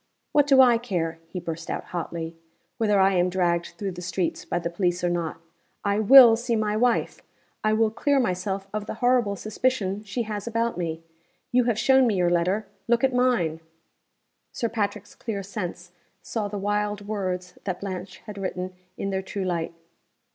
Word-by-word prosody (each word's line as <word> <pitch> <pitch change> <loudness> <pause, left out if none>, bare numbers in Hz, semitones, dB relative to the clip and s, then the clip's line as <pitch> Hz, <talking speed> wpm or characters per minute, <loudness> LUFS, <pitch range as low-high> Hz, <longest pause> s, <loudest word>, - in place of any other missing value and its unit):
"What 290 -1 +4
do 270 -2 +6
I 240 -3 +6
care," 170 -8 -2
he 180 - -5
burst 165 -1 -6
out, - - -3
hotly, 165 -1 -4 0.4
"whether 210 -3 +3
I 195 0 +5
am 180 0 +2
dragged 175 -2 0
through 195 0 -3
the 175 0 -8
streets 180 0 -2
by - - -1
the 170 -1 -3
police 175 0 0
or 175 - +2
not! 170 -2 -2 0.5
I 200 +1 +2
will 235 +1 +9
see 235 0 -1
my 215 -1 0
wife. 240 +2 +1 0.4
I 215 0 +3
will 220 0 +3
clear 285 +5 +2
myself 195 -3 -1
of 210 -1 -3
the - - -4
horrible 245 -3 +2
suspicion 210 -2 -1
she 215 +3 -3
has 210 -1 -5
about 230 0 0
me. 165 -2 -3 0.5
You 250 0 +3
have 235 -3 +1
shown 265 +1 +5
me 215 - +1
your 175 -2 +2
letter. 180 +5 +1 0.2
Look 235 +1 +2
at 265 -1 +3
mine!" 240 -11 +2 0.9
Sir 230 - -2
Patrick's 205 -2 -3
clear 205 -4 -4
sense 180 -3 -6 0.3
saw 215 -3 -2
the 205 0 -5
wild 205 0 -1
words 185 -4 -3
that 185 -3 -2
Blanche 185 -1 -6
had 210 -2 -8
written 185 -1 -4 0.2
in 195 - -2
their 190 0 -1
true 190 0 -4
light. 170 -2 -2
200 Hz, 185 wpm, -25 LUFS, 180-225 Hz, 0.9 s, will